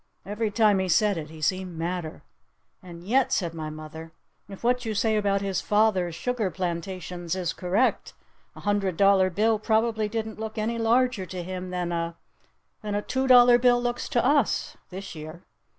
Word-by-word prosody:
Every 210 +3 -2
time 210 -2 +3
he 190 -1 -1
said 210 +3 +3
it 155 -1 -8
he 155 -1 -10
seemed 185 0 -1
madder. 170 -1 -4 0.6
"And 175 -2 -11
yet," 250 +7 +2
said 170 -4 0
my 155 -2 -5
mother, 155 +1 -9 0.4
"if 195 +2 -10
what 250 +1 +1
you 220 -2 -3
say 220 +1 +1
about 200 -2 +1
his 195 -2 -1
father's 205 -5 +1
sugar 235 0 -1
plantations 175 -1 -4
is 180 -3 -2
correct, 195 +8 0 0.4
a - - -11
hundred 200 -4 0
dollar 195 -1 +5
bill 215 +4 +1
probably 220 0 +1
didn't 220 0 -4
look 220 0 -6
any 230 +2 -1
larger 230 -3 +2
to 180 +1 -6
him 185 +1 -6
than 180 -1 -3
a 170 0 -3 0.6
than 210 -1 -3
a 205 - -1
two 265 +1 -1
dollar 245 -1 +7
bill 245 0 +4
looks 240 0 -3
to 240 - +1
us 280 -3 +1
this 195 +1 -8
year. 155 +2 -9
195 Hz, 180 wpm, -26 LUFS, 175-225 Hz, 0.6 s, dollar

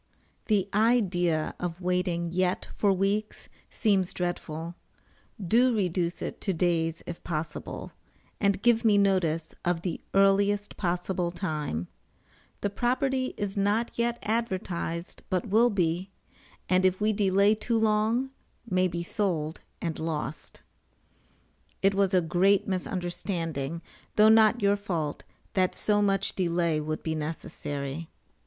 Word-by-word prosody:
The 200 -4 +2
idea 190 -8 +2
of 175 -1 -4
waiting 180 -2 -1
yet 180 +1 0
for 205 - +3
weeks 200 +3 -1 0.2
seems 195 -5 +1
dreadful; 170 -2 -3 0.7
do 235 +6 +3
reduce 180 -3 -1
it - - -5
to 195 - 0
days 165 -1 0
if 170 - -7
possible, 155 -2 -5 0.5
and 200 0 +1
give 235 -1 +4
me 215 -3 +5
notice 175 -5 +1
of 175 -1 0
the 180 - -3
earliest 200 +1 +3
possible 180 -1 -1
time. 150 - -3 0.7
The 205 - 0
property 255 +3 0
is 205 -2 -3
not 205 +4 +1
yet 235 0 0
advertised, 185 -6 -2
but 185 0 -1
will 230 +4 +5
be, 180 -2 0 0.6
[and 185 0 +3
if 185 0 +3
we 215 +1 +2
delay 200 0 +4
too 225 +2 -1
long, 220 +4 +1 0.4
may 185 -3 +2
be 170 -1 -3
sold 170 -5 -2 0.2
and 165 -2 -2
lost.] 155 -2 -4 1.2
It 195 +1 +4
was 195 -1 +2
a 180 - +5
great 185 +4 +3
misunderstanding, 175 -5 -3 0.3
though 215 +1 +7
not 220 +1 +5
your 200 0 +4
fault, 170 -7 -3 0.3
that 185 -2 +2
so 205 -1 +2
much 195 -1 +1
delay 170 -3 +1
would 155 +1 -4
be 160 - -1
necessary. 150 -1 -4
185 Hz, 130 wpm, -28 LUFS, 170-205 Hz, 1.2 s, though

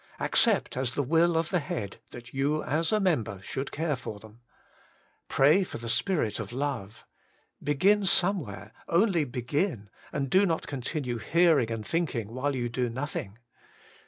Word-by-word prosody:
Accept - - +3
as 130 -1 -1
the 145 - +1
will 165 +4 +3
of 165 0 0
the 180 - +1
Head 110 -9 -5
that 120 0 -11
you 145 +3 0
as 160 +3 0
a 215 - +3
mem 175 - +2
ber 100 -3 -8
should 135 +7 -5
care 160 -1 -1
for 110 -5 -7
them. 110 +2 -16 0.9
Pray 150 +8 +4
for - - -6
the 115 - -7
Spirit 150 - 0
of - - -5
love. 125 -6 -4 0.6
Begin 195 +8 +3
somewhere 145 - +1
— - - -35
only 190 -7 +2
begin, 125 - -2 0.2
and 140 -2 -2
do 195 +2 +5
not 165 -2 -1
continue 130 -2 -3
hearing 160 -1 +3
and 115 -2 -4
thinking 130 -10 -1
while 140 +3 -1
you 120 -2 -1
do 120 +1 -1
nothing. 115 -5 -5
140 Hz, 165 wpm, -28 LUFS, 115-165 Hz, 0.9 s, do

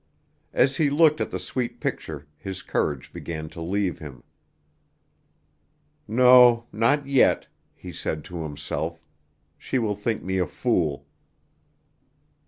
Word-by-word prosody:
As 135 0 +2
he 150 -3 +3
looked 155 +1 +4
at - - -1
the - - -3
sweet 125 -2 -4
picture 75 -2 -4
his 95 +5 -7
courage 70 -3 -2
began 80 -2 -6
to 85 - -9
leave 95 0 -1
him. 65 -6 -10 1.8
"No, 125 0 +6
not 115 +7 +2
yet," 140 -2 +3 0.3
he - - -9
said 75 -1 -3
to 90 0 -7
himself, 80 +2 -4 0.6
"she 130 - -2
will 110 -4 0
think 105 +2 -2
me 95 0 -1
a 90 - +1
fool." 80 - -1
95 Hz, 125 wpm, -25 LUFS, 80-125 Hz, 1.8 s, No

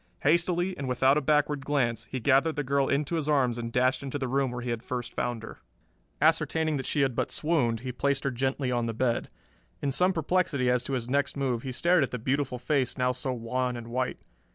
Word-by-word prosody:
Hastily 175 +4 +2
and 135 -2 -3
without 130 +2 +3
a 150 - +2
backward 150 -1 +1
glance, 120 -6 0
he 130 - -5
gathered 140 +6 +3
the 145 - -1
girl 140 0 +1
into 145 +3 0
his 155 -1 -2
arms 130 -5 +2
and 115 0 -4
dashed 130 +2 +2
into 140 0 -4
the 135 -2 -2
room 135 +1 +1
where 125 0 -5
he 120 - -2
had 115 -1 -3
first 125 -1 -5
found 120 -2 -2
her. - - -9 0.6
Ascertaining 160 -2 +2
that 130 - -4
she 145 - +1
had 135 -3 +1
but - - -1
swooned 125 -9 0
he 130 0 -4
placed 140 +2 0
her 140 - 0
gently 130 +1 -1
on 120 -1 0
the 115 - -3
bed. 120 0 0 0.5
In 140 - -1
some 180 +7 +3
perplexity 160 -6 +1
as 125 0 +1
to 140 - -3
his 120 -3 -2
next 140 +2 0
move 130 -4 0
he 130 - -5
stared 175 +7 +3
at 135 - +1
the 125 - -4
beautiful 130 +2 -1
face 130 +1 0
now 125 -1 +2
so 130 +1 -3
wan 125 +1 -2
and 120 0 -8
white. 125 +1 -1
130 Hz, 230 wpm, -28 LUFS, 125-145 Hz, 0.6 s, without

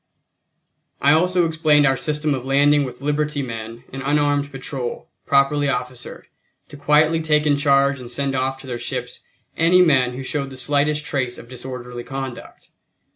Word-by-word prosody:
I 140 - +4
also 180 +2 +3
explained 155 -2 +3
our 135 -1 +3
system 150 +2 -1
of 130 -2 -4
landing 145 +2 +3
with 125 0 -9
liberty 150 0 -1
men 115 -1 -7
an 135 - -5
unarmed 145 0 +1
patrol, 135 -2 -6 0.2
properly 140 +1 +3
officered, 125 -1 -5 0.4
to - - -11
quietly 150 +3 +3
take 150 -1 +2
in 145 -1 +3
charge 140 -1 +2
and 125 -1 -9
send 140 +2 -2
off 135 0 -1
to - - -13
their 125 -2 -5
ships - - -5 0.4
any 180 +2 +5
men 130 -7 +3
who 130 +2 -6
showed 140 0 -3
the 130 - -10
slightest 145 +3 0
trace 130 -4 -2
of 115 - -12
disorderly 125 -1 -7
conduct. 135 -1 -8
140 Hz, 165 wpm, -21 LUFS, 130-150 Hz, 0.4 s, any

